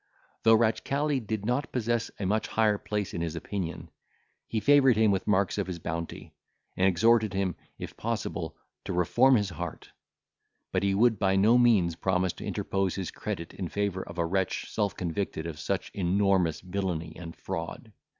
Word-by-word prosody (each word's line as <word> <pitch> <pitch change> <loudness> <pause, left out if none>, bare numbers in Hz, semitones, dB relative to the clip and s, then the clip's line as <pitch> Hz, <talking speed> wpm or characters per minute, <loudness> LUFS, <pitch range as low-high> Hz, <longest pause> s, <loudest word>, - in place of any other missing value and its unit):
Though 115 0 +6
Ratchcali 135 +6 +1
did 110 -3 -4
not 125 +5 -1
possess 120 -2 0
a 100 - -2
much 110 +3 0
higher 105 -2 +2
place 105 -2 -3
in 85 - -3
his 85 -1 -3
opinion, 90 0 -5 0.6
he 110 - -1
favoured 135 -2 +5
him 110 -2 +4
with 95 -1 -1
marks 100 -1 +2
of 100 - -1
his 90 -2 -4
bounty, 85 0 -5 0.4
and 95 - +3
exhorted 110 +3 +3
him, 95 -2 0 0.2
if - - -7
possible, - - -3 0.3
to 95 - -3
reform 120 +10 +4
his 105 -4 +1
heart; 85 0 -7 0.8
but 95 - +1
he 100 -1 +1
would 115 0 +3
by 95 -1 +2
no 105 +5 +5
means 100 -9 +4
promise 90 0 0
to - - -9
interpose 95 -2 -1
his 95 -3 -4
credit 95 -6 -5
in 95 - -4
favour 100 +1 -1
of 85 -1 -9
a 85 - +1
wretch 95 +2 -1
self 105 -2 -1
convicted 85 -2 -3
of 80 -3 -6
such - - -2
enormous 95 -2 +2
villany 90 -4 -3
and 80 -1 -8
fraud. 85 +6 -6
95 Hz, 175 wpm, -28 LUFS, 90-110 Hz, 0.8 s, Though